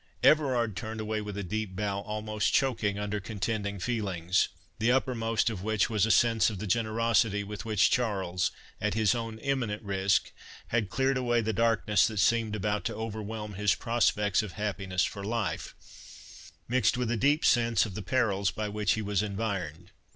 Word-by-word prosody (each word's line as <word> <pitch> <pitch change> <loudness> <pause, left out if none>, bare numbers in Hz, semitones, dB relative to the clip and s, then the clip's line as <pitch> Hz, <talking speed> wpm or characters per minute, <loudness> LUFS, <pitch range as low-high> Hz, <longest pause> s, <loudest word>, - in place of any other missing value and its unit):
Everard 125 -8 +3
turned 110 +1 -5
away 110 0 -2
with 105 -1 -6
a 100 - -3
deep 105 0 -3
bow, 100 0 -1
almost 105 0 -2
choking 115 -7 +1
under 105 0 -2
contending 100 0 -3
feelings; 95 -5 0 0.3
the 115 +2 +3
uppermost 115 -3 +1
of 100 -5 -6
which 110 +2 +1
was 105 -1 +2
a - - -2
sense 115 0 +4
of 105 - -6
the 105 - -5
generosity 110 0 +1
with 105 0 -7
which 110 -1 +3
Charles, 95 -7 0 0.3
at 105 0 0
his 110 -1 +3
own 115 -2 -4
imminent 115 -5 -2
risk, 95 -1 +1 0.4
had 110 -4 0
cleared 135 +3 +1
away 120 -2 +1
the 110 0 -1
darkness 110 -1 +3
that 110 - -5
seemed 110 +2 +2
about 105 0 -1
to 115 - -2
overwhelm 110 -1 -5
his 100 0 +2
prospects 105 -4 +1
of 105 -5 -7
happiness 100 -3 -1
for 100 - -6
life— 110 0 -3 0.9
mixed 125 0 +2
with 125 -2 -1
a - - +1
deep 145 +7 +2
sense 115 -4 +3
of 100 - -7
the 105 - -5
perils 100 -3 +1
by 105 +5 -3
which 105 -1 0
he 110 - -2
was 100 -2 0
environed. 95 -6 -4
105 Hz, 175 wpm, -29 LUFS, 100-115 Hz, 0.9 s, sense